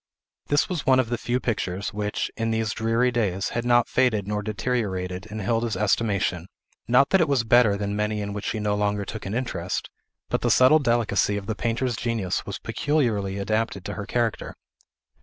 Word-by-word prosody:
This 145 Hz, 0 st, +2 dB
was 175 Hz, -5 st, -3 dB
one 130 Hz, -1 st, +4 dB
of 125 Hz, -3 st, 0 dB
the 120 Hz, -, -1 dB
few 125 Hz, +1 st, -1 dB
pictures, 100 Hz, -5 st, -2 dB
which, 105 Hz, 0 st, -2 dB
in 115 Hz, 0 st, -1 dB
these 110 Hz, -1 st, 0 dB
dreary 115 Hz, +3 st, +1 dB
days, 100 Hz, -5 st, 0 dB
had 120 Hz, -, -2 dB
not 120 Hz, 0 st, +3 dB
faded 110 Hz, -6 st, +1 dB
nor 105 Hz, 0 st, -1 dB
deteriorated 100 Hz, -4 st, -2 dB
in 110 Hz, 0 st, -6 dB
Hilda's 115 Hz, 0 st, 0 dB
estimation; 100 Hz, -4 st, 0 dB, 0.4 s
not 125 Hz, +4 st, +4 dB
that 190 Hz, -, +5 dB
it 165 Hz, -, +3 dB
was 140 Hz, -4 st, +2 dB
better 115 Hz, -3 st, +4 dB
than 100 Hz, 0 st, -2 dB
many 105 Hz, 0 st, -1 dB
in 100 Hz, -1 st, -4 dB
which 105 Hz, 0 st, -5 dB
she -, -, -2 dB
no 105 Hz, -1 st, 0 dB
longer 105 Hz, 0 st, 0 dB
took 110 Hz, +1 st, -6 dB
an 100 Hz, -, -3 dB
interest; 95 Hz, -8 st, -3 dB, 0.4 s
but -, -, -1 dB
the -, -, +1 dB
subtile 130 Hz, +5 st, +6 dB
delicacy 115 Hz, -6 st, +1 dB
of 100 Hz, -, -5 dB
the 110 Hz, -, -2 dB
painter's 120 Hz, +2 st, -1 dB
genius 110 Hz, -6 st, -2 dB
was -, -, -4 dB
peculiarly 110 Hz, -10 st, -1 dB
adapted 110 Hz, -1 st, -1 dB
to -, -, -4 dB
her 105 Hz, -1 st, -6 dB
character. 120 Hz, -2 st, -1 dB
110 Hz, 195 wpm, -25 LUFS, 100-120 Hz, 0.4 s, subtile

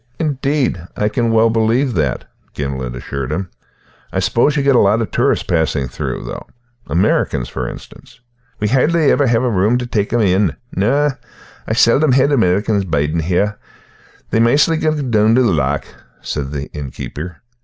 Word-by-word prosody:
"Indeed, 140 Hz, -, -1 dB
I 105 Hz, -, +1 dB
can 115 Hz, +1 st, 0 dB
well 115 Hz, 0 st, +4 dB
believe 115 Hz, +4 st, +1 dB
that," 75 Hz, -8 st, -1 dB, 0.3 s
Gimblet 65 Hz, -3 st, -4 dB
assured 65 Hz, +1 st, -5 dB
him. 95 Hz, -1 st, -3 dB, 0.6 s
"I -, -, -4 dB
suppose 145 Hz, +5 st, +2 dB
you 140 Hz, -, +1 dB
get 140 Hz, -1 st, +3 dB
a -, -, +6 dB
lot 105 Hz, +3 st, +3 dB
of 115 Hz, -, -3 dB
tourists -, -, +1 dB
passing 80 Hz, -5 st, 0 dB
through, -, -, -5 dB
though, -, -, -7 dB, 0.4 s
Americans, 80 Hz, -7 st, 0 dB
for -, -, -4 dB
instance?" -, -, -13 dB, 0.4 s
"We 105 Hz, -, 0 dB
hardly 150 Hz, +5 st, +3 dB
ever 140 Hz, -, +2 dB
hae 120 Hz, -1 st, +3 dB
a -, -, 0 dB
room 115 Hz, -1 st, +2 dB
tae 125 Hz, -, -3 dB
tak' 105 Hz, -4 st, -1 dB
them 120 Hz, -, +1 dB
in. 95 Hz, -2 st, +2 dB, 0.2 s
No, 140 Hz, +9 st, +2 dB, 0.6 s
I -, -, -1 dB
seldom 125 Hz, +5 st, +4 dB
hae 130 Hz, +1 st, +4 dB
an 145 Hz, -, +1 dB
American 105 Hz, -3 st, +2 dB
bidin' 75 Hz, +2 st, 0 dB
here; 95 Hz, +5 st, 0 dB, 0.7 s
they 110 Hz, -, +2 dB
maistly 145 Hz, +8 st, +3 dB
gang 150 Hz, -5 st, -1 dB
doon 110 Hz, +1 st, +4 dB
the 130 Hz, -, +4 dB
loch," 75 Hz, -, 0 dB, 0.4 s
said 70 Hz, -2 st, -3 dB
the 70 Hz, -1 st, -4 dB
innkeeper. 75 Hz, +4 st, -7 dB
110 Hz, 170 wpm, -17 LUFS, 85-125 Hz, 0.7 s, a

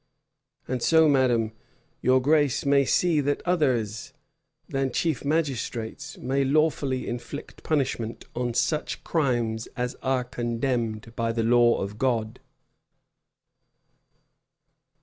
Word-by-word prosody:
And 125 Hz, -1 st, -2 dB
so, 160 Hz, +2 st, +5 dB
madam, 125 Hz, -6 st, +3 dB, 0.5 s
your 130 Hz, +1 st, +4 dB
grace 145 Hz, 0 st, +2 dB
may 140 Hz, 0 st, +4 dB
see 165 Hz, +2 st, +2 dB
that 145 Hz, +1 st, -1 dB
others 125 Hz, -, 0 dB, 0.5 s
than 135 Hz, -1 st, -1 dB
chief 155 Hz, 0 st, -1 dB
magistrates 140 Hz, -3 st, -2 dB
may 135 Hz, +2 st, 0 dB
lawfully 140 Hz, -2 st, +1 dB
inflict 120 Hz, +5 st, -7 dB
punishment 130 Hz, -7 st, -2 dB
on 120 Hz, -1 st, -2 dB
such 155 Hz, +4 st, -1 dB
crimes 120 Hz, -8 st, 0 dB
as 125 Hz, 0 st, -1 dB
are 130 Hz, -1 st, +1 dB
condemned 120 Hz, -2 st, -2 dB
by 115 Hz, 0 st, 0 dB
the 115 Hz, 0 st, -1 dB
law 120 Hz, 0 st, +4 dB
of 100 Hz, +2 st, -7 dB
God." 115 Hz, -4 st, 0 dB
130 Hz, 110 wpm, -26 LUFS, 115-140 Hz, 0.5 s, so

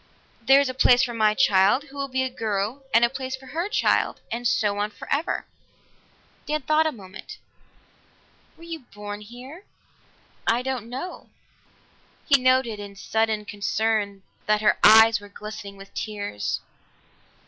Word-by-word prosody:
There 270 Hz, +4 st, +6 dB
is 280 Hz, -, +2 dB
a 255 Hz, -, -3 dB
place 250 Hz, -1 st, +5 dB
for 240 Hz, -, -2 dB
my 215 Hz, -2 st, +2 dB
child, 205 Hz, +1 st, +4 dB
who 285 Hz, -1 st, -16 dB
will 275 Hz, -1 st, -3 dB
be 260 Hz, 0 st, -1 dB
a 260 Hz, -, -1 dB
girl, 220 Hz, +2 st, -2 dB
and 230 Hz, +1 st, +5 dB
a -, -, +3 dB
place 260 Hz, +1 st, -5 dB
for 265 Hz, 0 st, -15 dB
her 340 Hz, +5 st, -2 dB
child -, -, +1 dB
and 240 Hz, +1 st, -1 dB
so 205 Hz, -2 st, +1 dB
on 205 Hz, +1 st, 0 dB
forever." 285 Hz, -, -3 dB, 1.0 s
Dan 300 Hz, -1 st, -1 dB
thought 310 Hz, +3 st, +3 dB
a -, -, 0 dB
moment. 190 Hz, -6 st, -11 dB, 1.2 s
"Were 330 Hz, -, -15 dB
you 335 Hz, -1 st, -6 dB
born 205 Hz, -5 st, -9 dB
here?" 250 Hz, -, -11 dB, 0.8 s
"I 235 Hz, +2 st, +2 dB
don't 255 Hz, -4 st, -4 dB
know." 265 Hz, +9 st, -7 dB, 1.0 s
He 280 Hz, -4 st, +5 dB
noted 255 Hz, -4 st, +2 dB
in 200 Hz, -1 st, -9 dB
sudden 220 Hz, +1 st, -1 dB
concern 205 Hz, -1 st, -1 dB, 0.2 s
that 215 Hz, 0 st, +2 dB
her 210 Hz, -, +3 dB
eyes 220 Hz, 0 st, +8 dB
were 205 Hz, 0 st, -13 dB
glistening 200 Hz, -1 st, -9 dB
with 195 Hz, 0 st, -13 dB
tears. 205 Hz, -, -4 dB
230 Hz, 155 wpm, -24 LUFS, 205-265 Hz, 1.2 s, eyes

